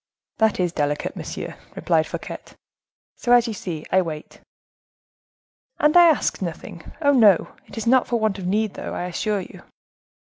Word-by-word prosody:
"That 220 -3 +2
is 180 -2 +1
delicate, 145 -2 -2
monsieur," - - -6 0.2
replied - - +1
Fouquet; - - -6 0.8
"so, 240 - +2
as 240 0 +5
you 225 - -3
see, 170 -6 -6
I 190 - +4
wait." 155 -3 -7 1.4
"And 300 +2 +2
I 350 -1 +8
ask 310 -9 +1
nothing, 170 -1 -7
oh! 285 - +5
no,—it 215 -7 +2
is 225 - -3
not 255 +2 +4
for 240 -2 0
want 215 -3 0
of 180 - -5
need, 210 +2 0
though, - - -6
I - - -3
assure 195 +3 -2
you." - - -12
205 Hz, 165 wpm, -22 LUFS, 175-235 Hz, 1.4 s, I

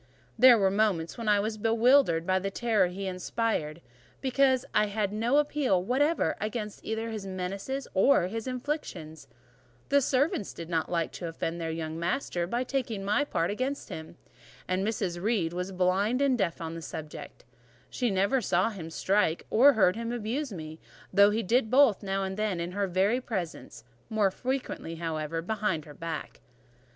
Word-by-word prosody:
There 245 0 +8
were 195 -2 +3
moments 195 -5 +1
when 230 -2 -3
I 205 -1 +5
was 215 +1 -2
bewildered 225 -5 +4
by 185 0 +2
the 195 +1 -2
terror 220 -1 +2
he 190 +2 -6
inspired, 185 -4 -2 0.4
because 260 -1 +2
I 210 0 +3
had 205 -1 -2
no 230 +6 +2
appeal 285 -11 +2
whatever 290 - +1
against 215 -1 -4
either 225 +1 -3
his 210 -3 -5
menaces 195 +9 -4
or 195 +1 +4
his 225 +6 -4
inflictions; 215 - -5 0.6
the 280 0 +4
servants 265 - 0
did 165 0 -8
not 165 -2 -1
like 170 -2 0
to 175 - -6
offend 165 +1 -4
their 165 - -2
young 160 0 -4
master 175 -1 -1
by 240 +6 -1
taking 250 -6 -3
my 210 +8 +2
part 175 -11 -1
against 260 +6 -3
him, 160 +1 -8 0.5
and 185 +1 0
Mrs. 195 -5 -2
Reed 195 -6 0
was 180 +2 -3
blind 190 +6 +1
and 280 -2 +3
deaf 185 -8 -1
on 165 0 -4
the 165 - -6
subject: 155 -1 -8 0.4
she 245 - -1
never 200 +7 +2
saw 185 +1 +1
him 170 -6 -7
strike 185 -1 +1
or 275 +6 +7
heard 195 -5 +3
him 230 +1 -4
abuse 240 +4 -3
me, 160 -3 -7 0.3
though 200 +1 +7
he 220 +2 0
did 230 +3 +2
both 260 -4 +5
now 195 -1 -1
and 190 0 -4
then 210 -5 -1
in 170 +1 -3
her 200 +1 -1
very 195 +7 +1
presence, 185 - -5 0.3
more 210 -3 +2
frequently, 255 -9 -4
however, 165 -1 -3
behind 210 -6 -1
her 150 - -11
back. 165 0 -6
200 Hz, 175 wpm, -28 LUFS, 175-235 Hz, 0.6 s, There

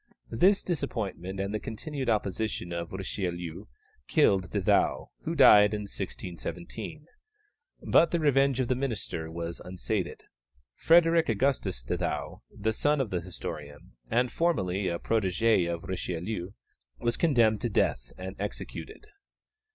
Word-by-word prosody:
This 190 - +4
disappointment 105 - -3
and 100 +1 -2
the 110 - -1
continued 130 +4 -4
opposition 105 -4 -1
of 85 -1 -4
Richelieu 90 -2 -4 0.4
killed 95 - +3
De - - -1
Thou, - - +2
who - - -1
died 105 0 +7
in 105 - -3
1617. 100 - -6 0.8
But 170 - +6
the 170 - 0
revenge 140 -3 +3
of 130 - +1
the 130 - +2
minister 115 -11 -3
was 85 0 -5
unsated. 95 +1 -3 0.5
Frederick 165 - +4
Augustus 115 - 0
de - - -2
Thou, - - -3
the 110 - -2
son 145 +5 +2
of 130 -6 -1
the 90 -2 -1
historian, 75 -4 -8 0.2
and 120 +2 +2
formerly 95 - 0
a 85 -1 -1
protégé 100 -2 +2
of 85 -1 -4
Richelieu, 90 +1 -3 0.5
was 120 0 0
condemned 115 -10 +3
to 120 - 0
death - - 0
and 95 +1 -6
executed. 105 - -6
105 Hz, 135 wpm, -29 LUFS, 90-130 Hz, 0.8 s, died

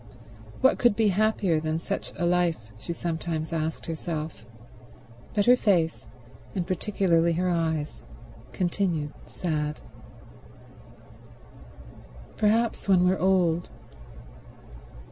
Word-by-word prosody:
What 260 - +4
could 240 -4 +4
be 220 -1 +3
happier 200 -4 +2
than 155 0 -1
such - - -4
a 175 - 0
life, 175 -1 +2 0.2
she 170 - -6
sometimes 165 -1 -3
asked 160 0 -2
herself; 160 -4 -4 0.9
but 205 -1 +3
her 245 - +7
face, 175 -9 +1 0.5
and 180 -3 -1
particularly 175 -3 +1
her 180 +2 0
eyes, 160 -3 -1 0.5
continued 175 -5 -1
sad. 150 -3 -2 2.6
"Perhaps 220 0 +1
when 185 -2 +5
we're 185 +1 +2
old 180 -3 +2
175 Hz, 100 wpm, -26 LUFS, 160-195 Hz, 2.6 s, her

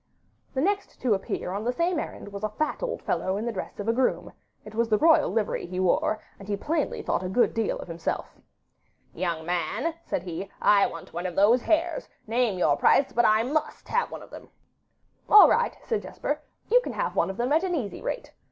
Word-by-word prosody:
The 265 - +1
next 400 +4 -1
to 245 -4 +3
appear 190 -2 -3
on 200 +3 -3
the 245 - +1
same 340 +5 0
errand - - -6
was 200 +1 -6
a 215 - 0
fat 300 +8 -2
old - - -3
fellow 190 +1 -1
in 215 - -3
the 235 - -1
dress 195 -1 -6
of 205 - -4
a 230 - +3
groom: 255 +1 0 0.3
it 210 - -10
was 230 +1 0
the 215 - +4
royal 320 +4 +5
livery 220 -5 -1
he 180 +1 -4
wore, 185 +3 +1 0.2
and 200 - -11
he 205 -1 -1
plainly 300 +7 -2
thought - - 0
a 185 - -3
good 240 +6 +2
deal 225 -2 0
of - - -8
himself. 165 -1 -4 0.8
'Young 170 -2 -2
man,' 205 - -1
said 175 - -3
he, 180 +2 -5
'I 200 -1 +5
want 165 - -10
one 175 +2 -3
of 180 - -6
those 220 +5 +5
hares; 330 - 0 0.2
name 230 -3 +1
your 155 -5 +3
price, 270 - +4
but 240 - +3
I 215 +1 +4
MUST 300 +5 -2
have 480 +1 +1
one - - -8
of - - -16
them.' - - -11 0.8
'All 420 - +10
right,' 475 +1 +1
said 450 -3 -1
Jesper; - - -4 0.3
'you - - +5
can - - -5
have - - -2
one - - +2
at 250 - +1
an 365 -2 0
easy 235 -10 -4
rate. - - -4
225 Hz, 215 wpm, -26 LUFS, 190-310 Hz, 0.8 s, All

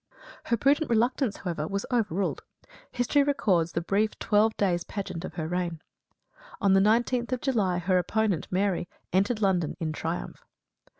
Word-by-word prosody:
Her 235 - +1
prudent 285 +6 +2
reluctance, 235 0 +1
however, 165 -4 -3
was 200 +2 -3
overruled. 205 -6 0 0.5
History 245 +4 +2
records 195 - +1
the 170 - -1
brief 205 +5 0
twelve 220 +1 +2
days' 175 -4 +1
pageant 185 -4 -5
of 180 - -7
her 160 -3 -3
reign. 175 -1 -2 0.8
On 200 -2 +3
the 195 - +6
19th 235 +4 +2
of 250 - -2
July 210 -10 +1
her 180 +1 +2
opponent, 210 -2 0
Mary 185 -2 0 0.2
entered 210 +4 +1
London 180 -5 +1
in 160 -2 -2
triumph. 165 +2 -5
200 Hz, 155 wpm, -27 LUFS, 175-230 Hz, 0.8 s, the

